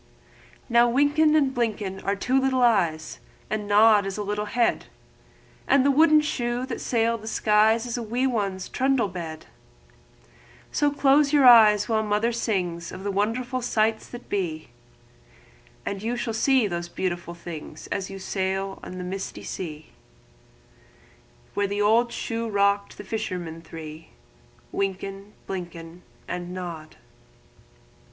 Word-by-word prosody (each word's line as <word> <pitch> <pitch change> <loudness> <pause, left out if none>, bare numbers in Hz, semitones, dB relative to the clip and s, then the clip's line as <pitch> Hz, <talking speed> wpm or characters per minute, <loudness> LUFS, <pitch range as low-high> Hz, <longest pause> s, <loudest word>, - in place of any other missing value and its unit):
Wynken 285 +6 +4
and 275 -3 +2
Blynken 210 -5 -2
are 200 - 0
two 255 +6 +1
little 260 -1 +2
eyes, 170 -9 +1 0.3
And 210 -1 -2
Nod 205 -1 +5
is 195 - -4
a 210 - -2
little 210 +1 -2
head, 235 +2 +1 0.8
And 275 -1 +4
the 280 - +5
wooden 310 +2 +5
shoe 245 -4 -2
that - - -5
sailed 230 -1 0
the 220 - -9
skies 220 +1 +3
Is 240 0 -3
a - - -3
wee 240 +4 -1
one's 200 -7 -1
trundle 260 -5 +1
bed; 165 -3 -7 1.3
So 290 -1 +2
shut 280 0 +3
your 290 -3 +5
eyes 215 -4 +7
while 220 -1 +1
Mother 215 +2 +1
sings 180 -7 -2
Of 190 - -8
wonderful 225 +6 -1
sights 220 -2 0
that 245 0 -10
be, 170 -6 -3 1.2
And 195 -1 -3
you 230 +3 -2
shall 235 -1 -3
see 260 +2 +3
the 175 -3 -3
beautiful 175 -2 -3
things 160 -3 -9
As 195 -2 -2
you 195 - -7
rock 190 0 -3
on 185 - -8
the 180 - -5
misty 190 +2 -5
sea 155 -4 -7 1.6
Where 205 0 0
the 205 +1 -1
old 230 +3 +3
shoe 230 -1 -3
rocked 200 0 +1
the - - -8
fishermen 180 -6 -4
three, 160 -1 -10 0.7
Wynken, 195 +1 -4
Blynken, 175 -2 -7 0.3
And 180 0 -5
Nod. 170 -4 -7
210 Hz, 140 wpm, -25 LUFS, 185-240 Hz, 1.6 s, eyes